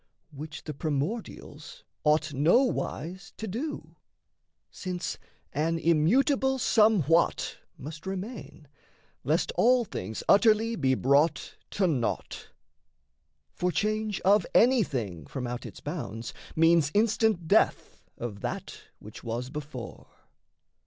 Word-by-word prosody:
Which 150 +2 -8
the 150 - -5
primordials 160 - -4 0.2
ought 155 0 +2
nowise 180 - 0
to 220 - -5
do. 255 +10 -5 0.7
Since 180 -2 -5 0.3
an 160 +3 0
immutable 255 - +2
somewhat 205 - +3 0.2
must 155 +5 -9
remain, 190 - -6 0.6
Lest - - +1
all 250 - +3
things 110 - -6
utterly 220 +2 +4
be 130 -6 +2
brought 140 +3 +2 0.2
to 200 - +3
naught. 135 -10 -2 1.0
For 180 0 -1
change 215 0 -1
of 200 0 +4
anything 130 - +2
from 125 - -5
out 120 0 -5
its - - -12
bounds 115 +3 -5 0.2
Means 165 -2 +4
instant 220 -5 +2
death - - +2 0.2
of 110 -4 -6
that - - -5 0.2
which 105 - -12
was 120 +2 -4
before. 140 -5 -8
165 Hz, 105 wpm, -28 LUFS, 140-215 Hz, 1.0 s, utterly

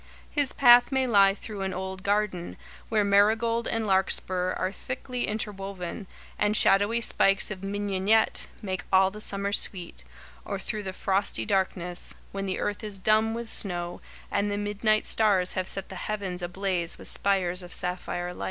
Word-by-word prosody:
His 290 -3 0
path 245 0 +6
may 265 -1 +1
lie 200 -5 +5
through 210 -2 -8
an 190 -1 -3
old 190 0 -5
garden, 200 -3 -1 0.3
where 215 -2 +2
marigold 220 +3 +2
and 225 -1 -1
larkspur 185 -1 +1
are 185 - -2
thickly 255 +2 -5
interwoven, 195 -3 -4 0.3
and 210 +1 +2
shadowy 205 +4 +3
spikes 195 -3 +3
of 195 -2 -7
mignonette 205 +2 +1 0.2
make 185 -3 -3
all 190 0 +4
the 210 +2 -8
summer 200 -1 0
sweet, 180 -4 0 0.4
or 200 - -4
through 210 +2 -5
the 190 -2 -5
frosty 195 +1 0
darkness, 185 -3 -1 0.2
when 195 0 -4
the 185 - -2
earth 205 +1 -3
is 210 -2 -2
dumb 215 +3 +2
with 235 0 -5
snow 175 -5 0 0.3
and 205 - 0
the 205 - -2
midnight 210 +1 0
stars 195 -5 +3
have 185 -1 -2
set 195 0 -3
the 190 - -8
heavens 195 -3 -4
ablaze 180 -1 -2
with - - -8
spires 190 -2 +1
of 180 0 -11
sapphire 180 -1 -2
light. - - -13
200 Hz, 165 wpm, -27 LUFS, 190-215 Hz, 0.4 s, path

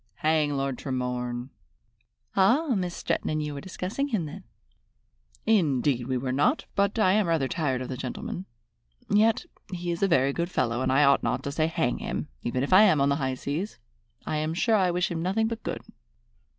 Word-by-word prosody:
"Hang 155 -2 +2
Lord 135 -2 -2
Tremorne!" 125 -2 -3 0.9
"Ah, 245 +12 +4
Miss 180 -3 -2
Stretton - - -2
and 155 0 -1
you 150 -1 -4
were 140 - -6
discussing 190 +8 -3
him 215 - -1
then?" 150 - -8 1.0
"Indeed 145 - +2
we 130 -1 0
were 130 +1 -2
not, 150 - +1
but 200 +2 +1
I 200 -4 +4
am 210 -2 +2
rather 160 -5 +1
tired 135 -5 -1
of - - -6
the 130 - -4
gentleman. 140 +8 -5 0.6
Yet 220 +8 +3 0.3
he 175 -1 -3
is 170 - -4
a 195 - +4
very 140 -6 +3
good 170 +3 -2
fellow, 120 -7 0
and 130 - +1
I 135 +3 +4
ought 140 0 +5
not - - -1
to 140 - -3
say 155 +2 +1
'Hang 160 -6 -1
him!' - - -4
even 125 +2 -1
if 145 - 0
I 190 - +9
am 190 -8 +5
on 140 0 +3
the 140 - +2
high 130 -3 -1
seas. 150 +11 -4 0.5
I 155 - -1
am 155 +2 -1
sure 220 +5 +2
I 190 -3 +3
wish 175 +1 0
him 165 -1 -2
nothing 200 +6 +1
but 230 0 -4
good." - - -4
155 Hz, 205 wpm, -27 LUFS, 135-190 Hz, 1.0 s, I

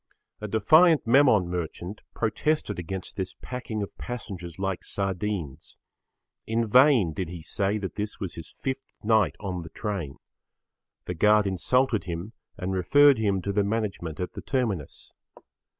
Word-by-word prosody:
A 105 - -5
defiant 155 - +5
Memon 115 -6 +5
merchant 90 +3 -5
protested 110 - 0
against 95 +2 -6
this 95 -2 -4
packing 120 -4 -4
of 100 - -8
passengers 95 -9 -6
like 95 -1 -2
sardines. 95 -6 -3 0.7
In 115 +1 +1
vain 125 - +5
did 90 +1 -3
he 85 -2 -8
say 100 +5 0
that 100 -3 -5
this 105 0 -4
was 95 -4 -4
his 80 -1 -8
fifth 135 0 -5
night 110 -2 +3
on 95 -4 -4
the 80 - -9
train. 95 -9 -4 0.9
The 90 - -3
guard 105 +4 +4
insulted 115 +5 +1
him 85 +5 -5 0.2
and 95 0 -3
referred 140 +8 +5
him 100 -4 +1
to 100 - -1
the 105 0 +2
management 100 -6 -3
at 90 - -3
the - - -7
terminus. 110 - -3
100 Hz, 150 wpm, -26 LUFS, 90-115 Hz, 0.9 s, defiant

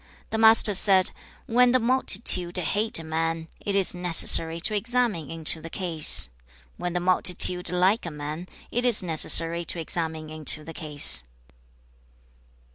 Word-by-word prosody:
The 220 - -4
Master 220 -1 +4
said, 190 -1 +4 0.3
'When 245 +1 +1
the 255 - +2
multitude 220 -7 +2
hate 205 +6 -1
a 165 - -8
man, 165 +1 -5
it 200 - -6
is 195 -2 +1
necessary 165 -2 +2
to 215 - -4
examine 230 - -3
into 160 -1 -4
the 165 - -11
case. 165 - 0 0.5
When 175 -1 -6
the 180 - -3
multitude 180 0 +1
like 180 +3 -1
a - - -5
man, 150 +3 -9 0.2
it 245 - -4
is 240 -6 +3
necessary 165 0 +1
to 170 - -6
examine 160 -2 -5
into 155 -1 -3
the 165 - -12
case.' 150 - +5
175 Hz, 145 wpm, -22 LUFS, 160-205 Hz, 0.5 s, case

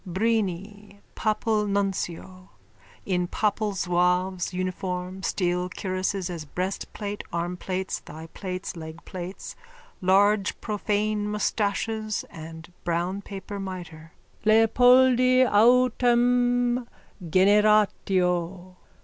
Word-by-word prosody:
_ - - -6
BRINI, 205 -1 -2
PAPAL 215 0 0
NUNCIO: 190 -2 -3 0.6
_(In 180 -2 -1
papal 210 0 0
zouave's 180 0 0
uniform, 185 0 -4
steel 180 -1 -1
cuirasses 185 0 -2
as 170 -4 -5
breastplate, 195 +5 -4
armplates, 180 +2 -3
thighplates, 180 +4 -6
legplates, 170 +3 -8 0.5
large 200 +2 +3
profane 210 0 -1
moustaches 215 +1 -1
and 160 +1 -10
brown 175 +3 -1
paper 200 0 -7
mitre.) 175 -4 -8 0.3
Leopoldi 250 +3 +5
autem 245 +1 +3 0.4
generatio. 185 -2 +2
195 Hz, 80 wpm, -25 LUFS, 180-215 Hz, 0.6 s, Leopoldi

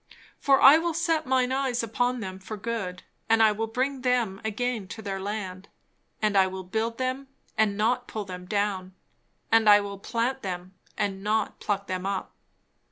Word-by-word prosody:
For 275 -1 +4
I 285 +4 +9
will 335 -1 -1
set 325 -2 +1
mine 255 -1 +2
eyes 260 -3 0
upon 245 +2 0
them 190 -2 -6
for 200 +3 -7
good, 195 -4 -4 0.3
and 225 0 +5
I 215 - +6
will 220 +2 -2
bring 260 +4 -1
them 240 -6 0
again 220 -1 -2
to 220 +4 -8
their 195 -2 -3
land; 195 -2 -5 0.5
and 210 -1 +2
I 190 -1 +5
will 190 0 -6
build 220 +5 -2
them, 260 +1 -2 0.3
and 215 -2 +2
not 245 +4 +1
pull 215 -2 -4
them 180 -1 -8
down; 195 -2 -1 0.6
and 225 -1 +5
I 205 0 +9
will 200 -1 -5
plant 240 +5 -1
them, 185 -1 -5 0.2
and 195 -1 -2
not 215 +1 0
pluck 200 -1 -1
them 185 0 -3
up. 195 -1 -3
215 Hz, 180 wpm, -27 LUFS, 195-250 Hz, 0.6 s, I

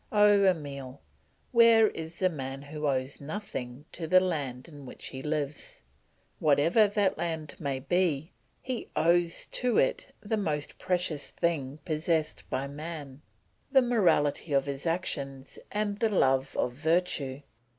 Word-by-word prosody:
Oh, 205 -1 +5
Emile, 140 -7 -2 0.5
where 230 -2 +6
is 160 +1 -7
the 185 - +2
man 135 -3 -6
who 150 +1 -4
owes 130 0 -1
nothing 140 -6 -6
to 165 -2 -4
the 185 +3 +7
land 145 -8 -3
in 145 -4 -11
which - - -8
he 130 - -7
lives? 150 - -3 0.6
Whatever 155 +9 +4
that 205 -1 +1
land 160 -3 -3
may 135 -3 -2
be, 160 0 0 0.3
he 255 -2 -4
owes 170 +1 +2
to 250 -1 0
it - - +1
the 220 +1 -2
most 150 -7 -2
precious 175 -5 -1
thing 145 -5 -1
possessed 155 -1 -1
by 135 - -1
man, 145 -1 -7 0.5
the 265 -2 +6
morality 170 -10 +2
of 135 -1 +3
his 140 +3 -4
actions 140 -6 -3
and 205 -1 -1
the 225 - +2
love 135 -8 +2
of 125 - +1
virtue. 150 -2 0
155 Hz, 140 wpm, -29 LUFS, 140-185 Hz, 0.6 s, the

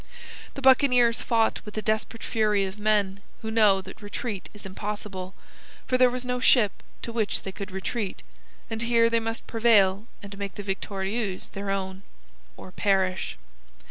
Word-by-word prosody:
The 275 - -7
buccaneers 250 -3 +5
fought 225 -2 +1
with 210 -1 -10
the 215 - -1
desperate 220 +2 -1
fury 210 -3 +1
of 190 +2 -7
men 205 -2 +1 0.2
who 220 - -3
know 210 -4 +4
that 190 +3 -11
retreat 205 -1 -5
is 210 -1 -14
impossible, 195 -1 -5 0.5
for 255 - 0
there 255 0 +6
was 250 0 -4
no 250 0 -1
ship 235 -5 +5 0.3
to 230 - -5
which 220 -3 -1
they 195 - -5
could 200 +1 -7
retreat, 190 +2 -4 0.4
and 225 0 -4
here 230 0 +3
they 230 - +3
must 225 0 -4
prevail 220 -3 +3 0.2
and 200 0 -8
make 200 -1 -4
the 205 - -6
Victorieuse 195 +1 -3
their 200 0 -5
own, 190 -1 -2 0.6
or 185 - -10
perish. 190 -1 0
210 Hz, 165 wpm, -26 LUFS, 195-230 Hz, 0.6 s, there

